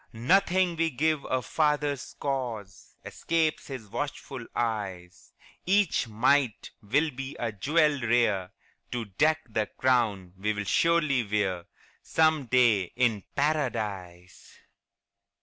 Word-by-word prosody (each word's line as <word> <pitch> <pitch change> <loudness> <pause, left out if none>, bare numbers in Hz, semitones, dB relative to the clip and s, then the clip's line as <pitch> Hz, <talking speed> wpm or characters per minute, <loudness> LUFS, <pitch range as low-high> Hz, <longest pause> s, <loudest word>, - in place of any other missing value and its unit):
Nothing 180 - +2
we 165 0 +2
give 155 +2 0
our 130 -1 -1
Father's 150 -2 -1
cause 120 -8 -4
Escapes 160 -2 -1
His 130 -6 -7
watchful 135 0 -5
eyes; 100 -6 -4 0.4
Each 190 -9 +2
mite 120 +2 +1
will 145 +9 +1
be 135 +1 -7
a 115 -2 -2
jewel 145 +6 +1
rare 110 -6 +1 0.4
To 120 -2 -3
deck 155 +11 +1
the 110 -2 -1
crown 110 -8 0
we'll 105 +1 -1
surely 155 - +2
wear 100 -4 -1 0.4
Some 155 -4 +2
day 115 -6 +4
in 115 -5 +1
Paradise. 105 - -3
125 Hz, 110 wpm, -27 LUFS, 105-150 Hz, 0.4 s, day